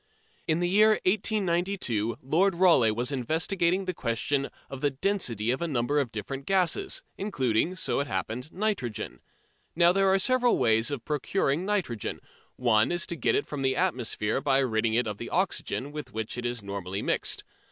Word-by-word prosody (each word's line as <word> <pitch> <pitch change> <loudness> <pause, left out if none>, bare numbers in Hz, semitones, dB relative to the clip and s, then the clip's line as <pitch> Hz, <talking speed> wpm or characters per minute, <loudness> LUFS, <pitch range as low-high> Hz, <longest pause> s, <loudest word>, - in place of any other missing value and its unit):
In 160 +1 +1
the 175 - +2
year 215 +4 +5
1892 185 - 0
Lord 175 +8 +2
Rayleigh 170 -10 +5
was 120 +4 0
investigating 170 - 0
the 185 - -2
question 135 +1 -1 0.2
of 135 -1 -8
the 145 - +2
density 130 - 0
of 130 - -2
a 170 - 0
number 140 0 0
of 130 -5 -1
different 135 +6 -6
gases, 195 - +1 0.2
including, 160 - 0
so 175 - -1
it 140 - -1
happened, 125 +4 -4
nitrogen. 190 - -2 0.6
Now 170 +1 +5
there 195 +1 +3
are 190 - +4
several 250 +4 +3
ways 115 -1 +3
of 140 -5 -5
procuring 150 +2 0
nitrogen. 180 - -2 0.4
One 110 -1 +3
is 175 -1 +1
to 170 - -4
get - - +1
it - - 0
from 145 -2 -5
the 130 0 +1
atmosphere 125 - 0
by 135 -1 +3
ridding 115 -4 +1
it 120 +1 +2
of 105 -2 -5
the 120 - -5
oxygen 175 -6 -1
with 150 0 -7
which 110 0 -4
it 120 0 -2
is 120 -3 -4
normally 100 -1 -4
mixed. - - 0
140 Hz, 175 wpm, -27 LUFS, 120-185 Hz, 0.6 s, year